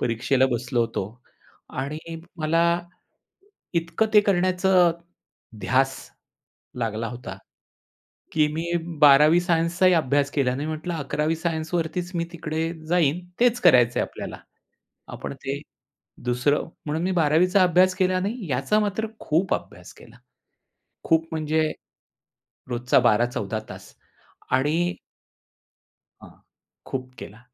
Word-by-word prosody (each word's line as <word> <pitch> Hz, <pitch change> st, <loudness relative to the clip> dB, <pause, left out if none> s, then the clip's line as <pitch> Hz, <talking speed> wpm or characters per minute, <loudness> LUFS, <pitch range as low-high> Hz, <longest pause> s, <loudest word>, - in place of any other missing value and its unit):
परीक्षेला 125 Hz, +3 st, +1 dB
बसलो 120 Hz, 0 st, -1 dB
होतो 115 Hz, -4 st, -1 dB, 0.7 s
आणि 140 Hz, +3 st, -3 dB, 0.4 s
मला, 165 Hz, +2 st, +2 dB, 0.9 s
इतकं 170 Hz, +5 st, 0 dB
ते 210 Hz, -, +9 dB
करण्याचं 185 Hz, -2 st, +3 dB, 0.7 s
ध्यास 135 Hz, +6 st, +2 dB, 0.8 s
लागला 115 Hz, -1 st, -2 dB
होता. 125 Hz, +1 st, -8 dB, 1.0 s
की 155 Hz, -1 st, +3 dB
मी 165 Hz, +2 st, -3 dB, 0.4 s
12वी 150 Hz, +3 st, +7 dB
सायन्सचाही 175 Hz, +1 st, +2 dB
अभ्यास 145 Hz, -3 st, +1 dB
केला 130 Hz, -3 st, 0 dB
नाही, 145 Hz, +3 st, -4 dB
म्हंटलं 155 Hz, +3 st, -4 dB
11वी 155 Hz, +1 st, -1 dB
सायन्सवरतीच 165 Hz, +1 st, -2 dB
मी 170 Hz, 0 st, 0 dB
तिकडे 160 Hz, -1 st, -3 dB, 0.2 s
जाईन, 165 Hz, -2 st, +2 dB, 0.2 s
तेच 245 Hz, 0 st, +3 dB
करायचं 120 Hz, -, +5 dB
आहे -, -, 0 dB
आपल्याला. -, -, -8 dB, 0.7 s
आपण -, -, -6 dB
ते 140 Hz, +1 st, -3 dB, 0.6 s
दुसरं 125 Hz, +4 st, +1 dB, 0.2 s
म्हणून 155 Hz, +2 st, -2 dB
मी 185 Hz, -, 0 dB
12वी 160 Hz, +3 st, +4 dB
चा 185 Hz, +1 st, +4 dB
अभ्यास 180 Hz, +1 st, +4 dB
केला 185 Hz, -1 st, +1 dB
नाही, 200 Hz, -, -4 dB
याचा 135 Hz, +11 st, +1 dB
मात्र 210 Hz, +1 st, -1 dB
खूप 170 Hz, +5 st, +1 dB
अभ्यास -, -, -8 dB
केला. -, -, -16 dB, 0.9 s
खूप 160 Hz, -1 st, +2 dB
म्हणजे 155 Hz, 0 st, 0 dB, 1.0 s
रोजचा 125 Hz, 0 st, +2 dB
12-14 115 Hz, -3 st, +1 dB
तास -, -, -11 dB, 0.6 s
आणि 155 Hz, +7 st, +1 dB, 1.3 s
हां, -, -, -13 dB, 0.6 s
खूप 130 Hz, -1 st, -5 dB
केला 105 Hz, -, -10 dB
155 Hz, 115 wpm, -24 LUFS, 130-175 Hz, 1.3 s, ते